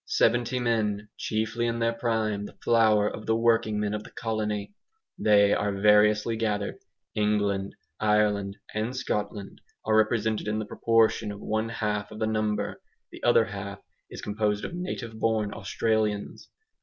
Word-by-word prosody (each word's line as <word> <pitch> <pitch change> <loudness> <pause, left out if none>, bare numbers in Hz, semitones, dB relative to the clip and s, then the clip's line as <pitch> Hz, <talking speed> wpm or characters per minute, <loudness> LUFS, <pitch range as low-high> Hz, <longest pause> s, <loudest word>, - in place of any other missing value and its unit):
Seventy 120 +2 +2
men, 110 -4 0
chiefly 110 +2 -1
in 115 0 -1
their 115 0 +1
prime, 110 -3 -1
the - - -15
flower 110 -3 +4
of 105 - -6
the 110 - +3
working 115 -2 +2
men 105 0 -1
of 105 0 -3
the - - -12
colony, 110 - -3 0.5
they 100 -1 +5
are 105 0 0
variously 105 +2 +4
gathered. 105 -2 -2 0.3
England, 105 -2 0 0.2
Ireland, 105 -2 +1 0.2
and 110 +4 -2
Scotland 105 -4 -3 0.2
are 110 - +2
represented 110 0 +1
in 105 0 0
the 110 - -2
proportion 115 0 +2
of 100 - -8
one 110 +2 -1
half 105 -2 -2
of 110 - -10
the 110 - 0
number; 110 -1 -1 0.3
the - - -11
other 120 -1 +5
half 100 -1 -6 0.3
is - - -9
composed 105 0 -1
of - - -6
native 130 -11 -5
born 110 -2 0
Australians. 110 -2 -1
110 Hz, 155 wpm, -27 LUFS, 105-115 Hz, 0.5 s, they